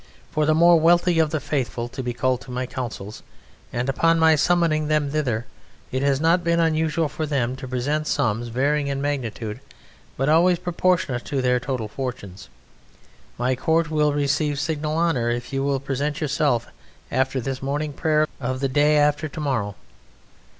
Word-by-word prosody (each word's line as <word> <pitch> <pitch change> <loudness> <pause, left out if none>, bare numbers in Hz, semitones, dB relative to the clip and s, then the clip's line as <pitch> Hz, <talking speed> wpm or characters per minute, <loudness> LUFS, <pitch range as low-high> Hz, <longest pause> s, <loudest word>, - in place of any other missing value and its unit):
for 155 -1 +1
the 155 - +4
more 170 +1 +6
wealthy 175 +1 +4
of 160 -1 +3
the 155 0 -1
Faithful 130 -4 -2
to 130 +2 -6
be 125 -1 -2
called 125 +1 0
to 135 - -13
my 125 +1 -3
councils, 120 -5 -6 0.5
and 120 +1 -2
upon 165 +5 +2
my 160 0 +5
summoning 160 -1 +2
them 150 -2 +1
thither 125 -7 -1 0.5
it 130 - -1
has 140 -1 +2
not 165 +3 +3
been 170 0 +2
unusual 160 -1 +1
for 155 +2 -4
them 130 -4 -1
to 130 0 -8
present 145 +5 -1
sums 115 +1 0
varying 140 +5 0
in 140 -1 -2
magnitude 120 -6 -3 0.6
but 135 - 0
always 170 +3 +4
proportionate 170 -8 0
to 140 -2 -2
their 125 -1 +2
total 125 -3 -3
fortunes. 105 -5 -6 0.9
My 125 +2 +1
court 160 +4 +1
will 150 -1 +2
receive 145 0 0
signal 155 0 -2
honour 155 -9 +1
if 120 +3 -3
you 135 0 0
will 140 -1 0
present 140 +2 -2
yourself 140 -5 +1 0.5
after 130 +1 0
the 130 +2 -3
morning 145 +2 -2
prayer 155 +1 +2
of 130 0 -3
the 135 - 0
day 150 +3 +3
after 150 +1 +2
to 150 - -8
morrow. 120 -9 -1
140 Hz, 175 wpm, -23 LUFS, 125-155 Hz, 0.9 s, more